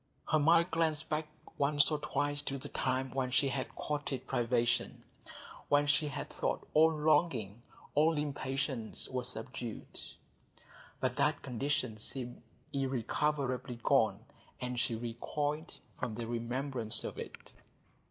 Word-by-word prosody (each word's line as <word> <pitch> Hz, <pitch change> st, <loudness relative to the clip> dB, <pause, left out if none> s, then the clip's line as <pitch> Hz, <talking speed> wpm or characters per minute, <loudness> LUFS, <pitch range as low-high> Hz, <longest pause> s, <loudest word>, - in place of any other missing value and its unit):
Her 155 Hz, -, +3 dB
mind 170 Hz, +3 st, +5 dB
glanced 160 Hz, -1 st, +2 dB
back 155 Hz, 0 st, 0 dB, 0.3 s
once 145 Hz, +1 st, +4 dB
or 150 Hz, -, 0 dB
twice 145 Hz, 0 st, +1 dB
to 140 Hz, -1 st, -3 dB
the 130 Hz, -, -7 dB
time 130 Hz, 0 st, 0 dB
when 130 Hz, -1 st, -1 dB
she 135 Hz, +2 st, +4 dB
had 135 Hz, -1 st, -3 dB
courted 145 Hz, -3 st, -3 dB
privation, 120 Hz, 0 st, +1 dB, 0.7 s
when 145 Hz, 0 st, +5 dB
she 150 Hz, +1 st, +3 dB
had 140 Hz, 0 st, -5 dB
thought -, -, -2 dB
all 160 Hz, +1 st, +6 dB
longing, 150 Hz, -, +2 dB, 0.3 s
all 155 Hz, +2 st, +4 dB
impatience 135 Hz, -4 st, -1 dB
was 125 Hz, -1 st, -2 dB
subdued; 120 Hz, -1 st, -5 dB, 1.0 s
but 130 Hz, -1 st, -1 dB
that 150 Hz, 0 st, +2 dB
condition 125 Hz, -3 st, -1 dB
seemed 120 Hz, +2 st, -2 dB, 0.3 s
irrecoverably 130 Hz, -1 st, -1 dB
gone, -, -, +3 dB, 0.3 s
and 125 Hz, -1 st, -2 dB
she 120 Hz, -2 st, +1 dB
recoiled 145 Hz, +7 st, -3 dB, 0.2 s
from 125 Hz, -5 st, -2 dB
the 115 Hz, +1 st, -3 dB
remembrance 120 Hz, 0 st, 0 dB
of -, -, -5 dB
it. -, -, -8 dB
135 Hz, 130 wpm, -33 LUFS, 120-150 Hz, 1.0 s, all